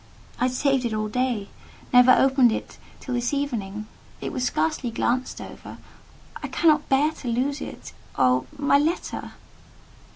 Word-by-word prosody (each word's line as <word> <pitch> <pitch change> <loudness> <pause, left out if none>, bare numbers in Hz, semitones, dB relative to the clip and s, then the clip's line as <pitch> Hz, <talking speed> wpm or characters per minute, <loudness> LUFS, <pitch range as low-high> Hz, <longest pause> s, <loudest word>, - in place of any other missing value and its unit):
I - - +2
had 255 - 0
saved 270 0 +1
it 230 -3 -1
all 215 0 -2
day—never 250 +1 +1
opened 265 -2 +5
it - - -5 0.2
till 255 - -5
this 245 +3 0
evening: 215 -7 -3 0.3
it - - -4
was 255 -4 -2
scarcely 200 - 0
glanced 245 +3 -1
over: - - -10 0.6
I - - -4
cannot 310 -2 +2
bear 285 +3 +3
to 280 - -10
lose 265 +5 -1
it. - - -8 0.2
Oh, 130 -1 +3
my 280 0 +3
letter!" 320 +4 -2
255 Hz, 150 wpm, -24 LUFS, 230-280 Hz, 0.6 s, opened